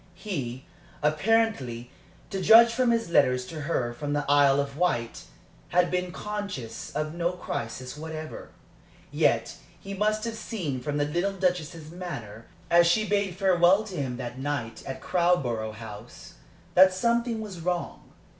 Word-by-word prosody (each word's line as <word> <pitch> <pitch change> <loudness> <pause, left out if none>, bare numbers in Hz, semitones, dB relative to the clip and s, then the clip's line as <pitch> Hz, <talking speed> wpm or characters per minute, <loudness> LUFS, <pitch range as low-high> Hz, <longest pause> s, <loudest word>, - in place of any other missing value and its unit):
He, 130 - -5 0.4
apparently, 150 - +1 0.4
to 195 -2 -2
judge 230 +4 +8
from 250 0 +2
his 230 -6 0
letters 125 -5 +3
to 155 +2 -7
her 130 -6 -1
from 145 +4 -4
the 145 -1 -1
Isle 140 -1 +5
of 140 -1 -2
Wight, 130 -9 -1 0.4
had 180 0 +2
been 180 0 -1
conscious 200 - -5
of 155 0 -2
no 170 +1 -1
crisis 125 -6 -5
whatever. 155 0 -7 0.6
Yet - - +1 0.2
he 200 - -7
must 215 +2 0
have 230 -1 -2
seen 180 - -4
from 145 +3 -2
the 145 - +1
little 175 +7 -1
Duchess's 175 -4 -2
manner, 120 - -7 0.2
as 170 0 +6
she 215 +5 +2
bade 200 -3 0
farewell 185 +1 +4
to 205 -4 -8
him 130 -6 -3
that 125 0 -6
night 135 -5 -3
at 130 -1 -6
Crowborough 125 -12 +1
House, 110 +1 -10 0.4
that 190 +1 +7
something 235 +3 +1
was 205 -5 -7
wrong. 175 +1 -3
170 Hz, 150 wpm, -27 LUFS, 130-195 Hz, 0.6 s, judge